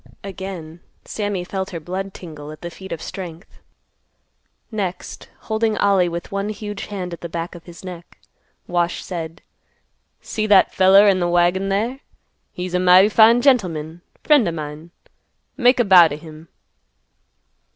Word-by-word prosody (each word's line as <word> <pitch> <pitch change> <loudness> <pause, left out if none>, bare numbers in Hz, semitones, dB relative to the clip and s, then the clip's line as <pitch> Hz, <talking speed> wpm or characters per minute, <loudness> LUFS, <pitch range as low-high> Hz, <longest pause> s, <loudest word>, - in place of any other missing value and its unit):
Again 185 -4 -7 0.3
Sammy 205 -4 -3
felt 190 +1 -4
her 170 - -6
blood 185 +4 -5
tingle 155 -5 -10
at 155 - -12
the 170 - -6
feat 190 +2 -11
of 165 - -5
strength. 175 -1 -9 1.1
Next 190 -5 -5
holding 220 0 -1
Ollie 195 -3 +3
with 170 0 -6
one 200 +1 -2
huge 205 -1 -6
hand 185 -4 -5
at 170 - -9
the 170 - -6
back 165 +1 -5
of 170 -2 -12
his 170 -1 -13
neck, 175 -2 -10 0.5
Wash 175 -1 -1
said, 165 -2 -7 0.8
"See 215 -1 -3
that 200 -2 +5
feller 195 +2 +6
in 190 -2 +3
th' 175 -1 0
wagon 175 +3 +2
there? 225 +7 -1 0.5
He's 180 0 -6
a 180 - +2
mighty 185 +2 +6
fine 230 +2 +5
gentleman; 175 - +1 0.2
friend 290 - +4
o' - - 0
mine. 155 0 -7 0.7
Make 250 -1 +3
a 240 - +3
bow 180 -4 +8
t' 145 - -5
him." 155 0 -13
185 Hz, 155 wpm, -20 LUFS, 170-200 Hz, 1.1 s, bow